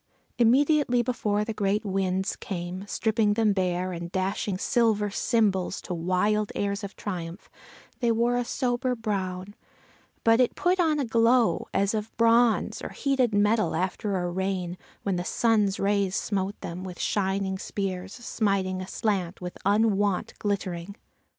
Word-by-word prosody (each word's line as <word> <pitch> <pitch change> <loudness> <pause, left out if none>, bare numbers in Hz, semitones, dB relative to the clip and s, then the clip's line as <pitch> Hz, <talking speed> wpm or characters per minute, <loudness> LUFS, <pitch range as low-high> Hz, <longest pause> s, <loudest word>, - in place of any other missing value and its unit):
Immediately 255 +1 +4
before 210 -4 0
the 225 - -3
great 210 +1 0
winds 190 -1 0
came, 185 +1 -5
stripping 220 -1 +1
them 220 -2 +3
bare, 185 -1 -1
and 170 0 -6
dashing 190 +1 -1
silver 210 -1 +1
cymbals 200 -5 +1
to 180 - -4
wild 185 +5 +1
airs 200 +1 -1
of 200 - -6
triumph, 175 -1 -6 0.5
they 235 -2 +2
wore 235 +2 +2
a 245 - +1
sober 250 +1 -1
brown, 195 -3 -3 0.7
but 225 +1 +5
it 250 - +3
put 365 +1 +1
on 320 -3 +3
a 280 - 0
glow, 230 +1 +3
as 200 +2 +1
of 215 0 -4
bronze 230 0 +3
or - - -5
heated 260 -6 0
metal 210 +2 +2
after 190 +2 -1
a 175 -1 -2
rain, 185 -1 -2 0.3
when 195 -3 0
the 175 - -2
sun's 210 -1 +1
rays 200 -1 +1
smote 200 -1 -2
them 175 +2 -6
with 180 -2 -8
shining 190 -1 0
spears 190 -2 -4
smiting 195 -6 -1
aslant 185 -2 -2
with 180 -1 -6
unwonted 205 -2 +1
glittering. 195 -2 -3
205 Hz, 145 wpm, -26 LUFS, 185-225 Hz, 0.7 s, but